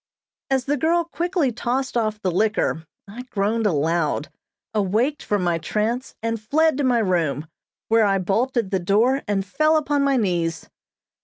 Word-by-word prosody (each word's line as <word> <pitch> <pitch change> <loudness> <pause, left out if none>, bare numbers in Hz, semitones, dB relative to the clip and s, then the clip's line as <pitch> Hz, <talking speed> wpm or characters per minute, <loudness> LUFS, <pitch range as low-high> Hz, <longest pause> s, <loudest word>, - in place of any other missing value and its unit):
As 265 -2 +1
the 290 +1 0
girl 335 +5 +2
quickly 340 -4 -1
tossed 245 +3 -2
off 215 -2 0
the 185 -3 -1
liquor, 185 -4 0 0.2
I 215 +5 -8
groaned 220 -2 -1
aloud, 155 -2 0 0.4
awaked 220 +8 0
from 205 -3 -1
my 170 -1 +1
trance, 220 +9 -2
and 230 -1 -2
fled 310 +5 +2
to - - +1
my 250 -2 +3
room, 170 -8 0 0.4
where 225 -1 +4
I 195 -1 +2
bolted 220 +3 0
the 190 - +1
door, 225 +10 +2
and 195 -2 0
fell 310 +10 +2
upon 290 -1 0
my 275 -1 +2
knees. 170 -6 -1
220 Hz, 160 wpm, -22 LUFS, 190-265 Hz, 0.4 s, where